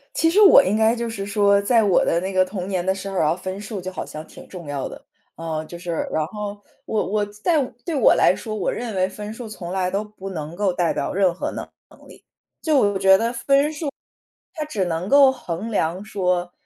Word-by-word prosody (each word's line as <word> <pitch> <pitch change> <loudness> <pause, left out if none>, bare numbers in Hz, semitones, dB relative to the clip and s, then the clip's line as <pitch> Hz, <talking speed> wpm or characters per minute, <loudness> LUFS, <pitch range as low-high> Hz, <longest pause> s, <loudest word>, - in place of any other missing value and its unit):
其 325 - +3
实 395 +6 +4
我 395 - +9
应 190 +3 0
该 220 +1 +3
就 235 -1 -3
是 200 -3 -5
说， 200 0 +3
在 225 +2 +3
我 200 -3 +3
的 170 - +2
那 190 +2 -4
个 185 0 +4
童 185 -1 -5
年 185 -3 -2
的 190 - +2
生 195 0 -6
涯， 160 -2 +2
分 185 +1 -6
数 210 0 -6
就 185 +1 -6
好 - - -5
像 155 +1 -8
挺 - - -13
重 175 -4 -10
要 145 -1 -3
的。 - - -12 0.3
呃， 160 -1 -4
就 170 +2 -10
是， 170 -2 -3
然 155 - 0
后 205 +1 -6 0.2
我 215 - -1
我 210 +1 0
在 215 +10 0 0.2
对 335 - -2
我 275 - +5
来 - - +4
说， 220 - -6
我 215 - -1
认 235 -2 -4
为 185 0 +2
分 210 +2 -7
数 235 0 -8
从 180 -5 -7
来 185 -1 0
都 200 +3 -1
不 210 -2 -9
能 160 -3 -6
够 195 -1 0
代 175 -2 +1
表 - - -2
任 190 -2 +2
何 180 - -4
能 - - -6 0.2
能 - - -19
力。 - - -16 0.4
就 310 -3 +2
我 205 -6 +2
觉 190 0 +6
得 230 +3 -1
分 275 +4 +2
数， 305 -1 -4 0.7
它 310 -3 -3
只 215 -11 -2
能 170 +2 -3
够 280 +1 +7
衡 225 -5 -5
量 180 -3 -1
说， 180 -4 -1
195 Hz, 250 characters per minute, -22 LUFS, 180-220 Hz, 0.7 s, 我